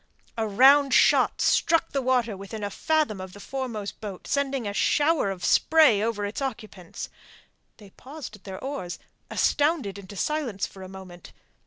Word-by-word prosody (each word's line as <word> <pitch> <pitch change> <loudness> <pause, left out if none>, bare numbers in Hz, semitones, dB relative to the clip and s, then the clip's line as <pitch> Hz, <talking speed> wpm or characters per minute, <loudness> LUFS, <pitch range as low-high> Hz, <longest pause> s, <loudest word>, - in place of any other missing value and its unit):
A 225 -1 -1
round 270 +6 +5
shot - - +4
struck 330 -1 +2
the 275 - -1
water 245 -4 +1
within 200 +3 -8
a 200 - -3
fathom 305 -8 0
of 185 -1 -9
the 205 - -12
foremost 230 -4 -5
boat, 200 -4 -7
sending 275 -4 -1
a 200 - -3
shower 295 0 +2
of 180 -2 -4
spray 305 -10 +5
over 215 -2 -1
its 205 +6 -5
occupants. 215 -9 -6 0.7
They 205 -3 -15
paused 275 -1 -10
at 205 - -19
their 190 -1 -7
oars, 265 -11 -5 0.3
astounded 290 - +1
into 200 +1 -11
silence 255 -4 -2
for 195 - -12
a 185 - -9
moment. 185 -2 -12
220 Hz, 165 wpm, -26 LUFS, 195-275 Hz, 0.7 s, round